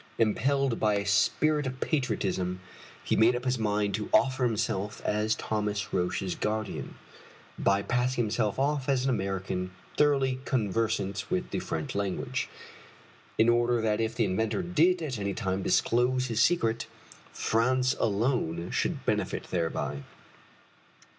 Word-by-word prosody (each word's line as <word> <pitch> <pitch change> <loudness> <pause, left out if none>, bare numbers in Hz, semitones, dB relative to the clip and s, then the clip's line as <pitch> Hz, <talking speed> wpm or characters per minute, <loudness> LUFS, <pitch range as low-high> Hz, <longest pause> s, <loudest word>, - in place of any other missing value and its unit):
Impelled 130 +3 +1
by 105 -1 +2
a 100 0 -1
spirit 145 +8 +2
of 130 0 -5
patriotism, 100 - -1 0.4
he - - +1
made 115 +3 +5
up 125 +1 -4
his 125 -1 0
mind 105 -2 0
to 105 0 -3
offer 130 -1 +3
himself 105 -3 -1
as 105 +1 +1
Thomas 105 -2 -2
Roch's 90 +1 -1
guardian, 110 -1 -3 0.6
by 100 0 +2
passing 125 +1 +1
himself 110 -1 0
off 140 0 0
as 130 -2 +2
an 135 - +1
American 95 -4 -2 0.3
thoroughly 135 -3 +3
conversant 110 -4 -1
with 185 0 -2
the - - -1
French 145 -6 -4
language, 100 -2 -2 0.9
in 110 - +4
order 120 0 +3
that 110 0 +1
if 115 0 -1
the 115 - +2
inventor 110 - 0
did 175 0 +2
at 130 -7 -3
any 100 -1 -2
time 95 -4 -1
disclose 125 +6 +2
his 115 -2 0
secret, 115 -6 +2 0.4
France 125 +3 +1
alone 100 -6 0
should - - -1
benefit - - -1
thereby. 80 -4 -2
110 Hz, 140 wpm, -28 LUFS, 100-130 Hz, 0.9 s, made